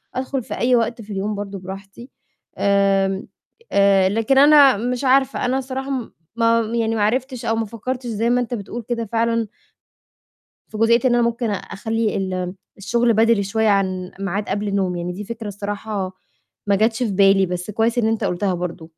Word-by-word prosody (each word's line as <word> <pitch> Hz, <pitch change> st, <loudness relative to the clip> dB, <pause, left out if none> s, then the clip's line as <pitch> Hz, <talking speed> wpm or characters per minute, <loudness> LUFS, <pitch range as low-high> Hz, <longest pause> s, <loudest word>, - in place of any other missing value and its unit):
أدخُل 260 Hz, -1 st, -2 dB
في -, -, -7 dB
أي 250 Hz, +1 st, +3 dB
وقت 230 Hz, 0 st, 0 dB
في 210 Hz, 0 st, -11 dB
اليوم 205 Hz, +2 st, -2 dB
برضه 200 Hz, -1 st, -6 dB
براحتي. 195 Hz, +6 st, -10 dB, 0.5 s
آمم، 195 Hz, 0 st, +2 dB, 0.4 s
آآ، 195 Hz, -1 st, +4 dB
لكن 225 Hz, +6 st, +1 dB
أنا 285 Hz, -4 st, +7 dB
مش 245 Hz, +4 st, -2 dB
عارفة، 265 Hz, 0 st, +2 dB
أنا 255 Hz, +2 st, +1 dB
الصراحة 265 Hz, +1 st, -4 dB
م 255 Hz, -4 st, -3 dB, 0.2 s
ما 230 Hz, 0 st, +3 dB
م 225 Hz, +1 st, -3 dB
يعني 225 Hz, -1 st, 0 dB
ما 210 Hz, -, +1 dB
عرفتش 250 Hz, +2 st, -1 dB
أو 225 Hz, -, +1 dB
ما 225 Hz, 0 st, -1 dB
فكّرتش 245 Hz, +4 st, -5 dB
زي 225 Hz, +1 st, -1 dB
ما 245 Hz, 0 st, +2 dB
أنت 245 Hz, 0 st, -4 dB
بتقول 235 Hz, +2 st, -5 dB
كده 230 Hz, -1 st, -1 dB
فعلًا 230 Hz, 0 st, 0 dB, 1.2 s
في 215 Hz, -, -8 dB
جزئيّة 230 Hz, +2 st, +4 dB
إن 240 Hz, -1 st, +4 dB
أنا 240 Hz, -, +3 dB
ممكن 235 Hz, -1 st, -1 dB
أخلّي 220 Hz, +2 st, -2 dB
ال 185 Hz, -1 st, -3 dB, 0.2 s
الشُغل 235 Hz, +3 st, +1 dB
بدري 225 Hz, -1 st, +3 dB
شوية 220 Hz, +2 st, +1 dB
عن 185 Hz, -2 st, 0 dB
ميعاد 200 Hz, +1 st, -3 dB
قبل 205 Hz, 0 st, -1 dB
نومي. 180 Hz, -3 st, -1 dB
يعني 175 Hz, +1 st, -3 dB
دي 205 Hz, +3 st, -6 dB
فكرة 225 Hz, 0 st, -7 dB
الصراحة 200 Hz, -1 st, -4 dB, 0.6 s
ما 200 Hz, -, +3 dB
جاتش 220 Hz, +4 st, +1 dB
في 215 Hz, -, -1 dB
بالي، 195 Hz, 0 st, +4 dB
بس 180 Hz, +3 st, -4 dB
كويس 225 Hz, +3 st, 0 dB
إن 225 Hz, -2 st, +2 dB
أنت 225 Hz, -1 st, -1 dB
قُلتها 185 Hz, +1 st, 0 dB
برضه. 170 Hz, -2 st, -5 dB
220 Hz, 185 wpm, -21 LUFS, 195-235 Hz, 1.2 s, أنا